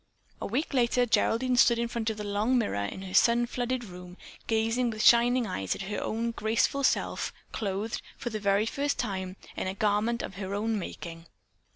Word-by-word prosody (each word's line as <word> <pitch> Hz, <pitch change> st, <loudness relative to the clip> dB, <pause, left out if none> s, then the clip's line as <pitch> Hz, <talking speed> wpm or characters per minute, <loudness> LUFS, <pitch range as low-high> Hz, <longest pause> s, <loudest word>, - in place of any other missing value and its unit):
A -, -, -2 dB
week 270 Hz, +9 st, -2 dB
later 245 Hz, -1 st, +3 dB
Geraldine 250 Hz, +2 st, +2 dB
stood 235 Hz, -1 st, +6 dB
in 235 Hz, 0 st, 0 dB
front 230 Hz, -1 st, -2 dB
of 220 Hz, -, -4 dB
the 210 Hz, -, -4 dB
long 210 Hz, +5 st, +1 dB
mirror 100 Hz, -, 0 dB
in 190 Hz, -, -6 dB
her 185 Hz, -1 st, -7 dB
sun 240 Hz, 0 st, +5 dB
flooded 245 Hz, +1 st, -2 dB
room, 180 Hz, -3 st, -10 dB, 0.3 s
gazing 225 Hz, +2 st, +1 dB
with 215 Hz, -1 st, -3 dB
shining 240 Hz, +1 st, +6 dB
eyes 95 Hz, -, -2 dB
at -, -, -6 dB
her 205 Hz, +1 st, -3 dB
own 230 Hz, +1 st, -1 dB
graceful 230 Hz, +5 st, 0 dB
self, -, -, +1 dB, 0.2 s
clothed, 205 Hz, +1 st, -3 dB, 0.2 s
for 240 Hz, -, -4 dB
the 215 Hz, -, -3 dB
very 200 Hz, +1 st, +2 dB
first 285 Hz, +5 st, -1 dB
time, 190 Hz, -5 st, -3 dB, 0.2 s
in -, -, -3 dB
a 190 Hz, -, -3 dB
garment 215 Hz, +3 st, +1 dB
of 190 Hz, -, -7 dB
her 195 Hz, 0 st, -4 dB
own 220 Hz, +1 st, 0 dB
making. 170 Hz, -2 st, -7 dB
220 Hz, 195 wpm, -28 LUFS, 200-240 Hz, 0.3 s, stood